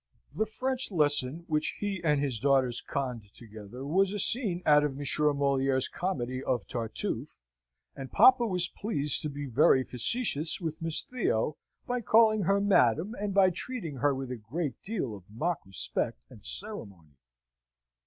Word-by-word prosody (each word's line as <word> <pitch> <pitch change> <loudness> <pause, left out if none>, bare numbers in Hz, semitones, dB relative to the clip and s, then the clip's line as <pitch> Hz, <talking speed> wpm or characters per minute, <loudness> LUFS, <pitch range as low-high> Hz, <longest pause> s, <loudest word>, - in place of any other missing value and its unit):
The 220 - 0
French 260 +4 -2
lesson 150 -3 +1
which 155 -2 -1
he 200 -3 -3
and 150 -3 +2
his 135 -5 -1
daughters 130 -2 +2
conned 120 -7 -4
together 110 +3 -10
was 190 +6 +2
a 210 - -3
scene 200 -4 +1
out 150 -1 +5
of 140 -2 -2
Monsieur 150 +1 +2
Moliere's 135 -2 +1
comedy 130 -8 -3
of 125 -5 -1
"Tartuffe," 115 -2 -4 0.6
and 135 -1 -8
papa 250 -2 +6
was 180 -3 +2
pleased 150 - 0
to 150 - -3
be 145 0 -6
very 130 +1 +4
facetious 155 - +1
with 160 -3 -5
Miss 165 -1 -1
Theo, 155 - -1 0.3
by 245 0 -2
calling 215 0 +4
her 195 +2 +2
Madam, 195 - +2
and 205 0 -2
by 190 -1 +4
treating 180 - -5
her 140 +1 +1
with 130 -1 -5
a 125 - -4
great 130 +5 -5
deal 195 - -3
of 95 -2 -15
mock 155 +9 -2
respect 95 -9 -2
and - - -14
ceremony. 75 - -5
150 Hz, 160 wpm, -29 LUFS, 125-190 Hz, 0.6 s, papa